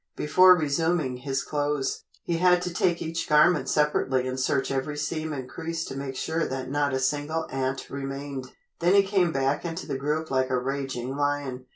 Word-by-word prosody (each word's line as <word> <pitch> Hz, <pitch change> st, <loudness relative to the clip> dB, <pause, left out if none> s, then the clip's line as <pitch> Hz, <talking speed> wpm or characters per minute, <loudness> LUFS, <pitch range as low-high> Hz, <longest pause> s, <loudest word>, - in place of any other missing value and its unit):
Before 185 Hz, +4 st, +6 dB
resuming 155 Hz, -3 st, 0 dB
his 135 Hz, +1 st, -2 dB
clothes, 145 Hz, -2 st, -2 dB, 0.2 s
he 170 Hz, -, -1 dB
had 180 Hz, 0 st, +4 dB
to 180 Hz, -1 st, -3 dB
take 170 Hz, 0 st, +1 dB
each 165 Hz, +1 st, -3 dB
garment 150 Hz, +4 st, +4 dB
separately 135 Hz, -4 st, +1 dB
and 130 Hz, 0 st, -3 dB
search 135 Hz, +1 st, 0 dB
every 135 Hz, +2 st, -2 dB
seam 155 Hz, +1 st, -2 dB
and 135 Hz, -4 st, -5 dB
crease 165 Hz, +2 st, -4 dB
to -, -, -7 dB
make 135 Hz, -1 st, -5 dB
sure 160 Hz, +4 st, -1 dB
that 130 Hz, 0 st, -4 dB
not 145 Hz, 0 st, +1 dB
a 130 Hz, -, 0 dB
single 145 Hz, +4 st, -1 dB
ant 135 Hz, 0 st, -2 dB
remained. 135 Hz, -1 st, -5 dB, 0.3 s
Then 175 Hz, +3 st, +3 dB
he 200 Hz, -, +7 dB
came 190 Hz, -3 st, +2 dB
back 135 Hz, 0 st, 0 dB
into 170 Hz, +1 st, -4 dB
the 135 Hz, -, -3 dB
group 150 Hz, +3 st, -2 dB
like 130 Hz, -1 st, +1 dB
a 130 Hz, -, +1 dB
raging 135 Hz, -1 st, -3 dB
lion. 145 Hz, -3 st, -2 dB
145 Hz, 190 wpm, -26 LUFS, 135-160 Hz, 0.3 s, he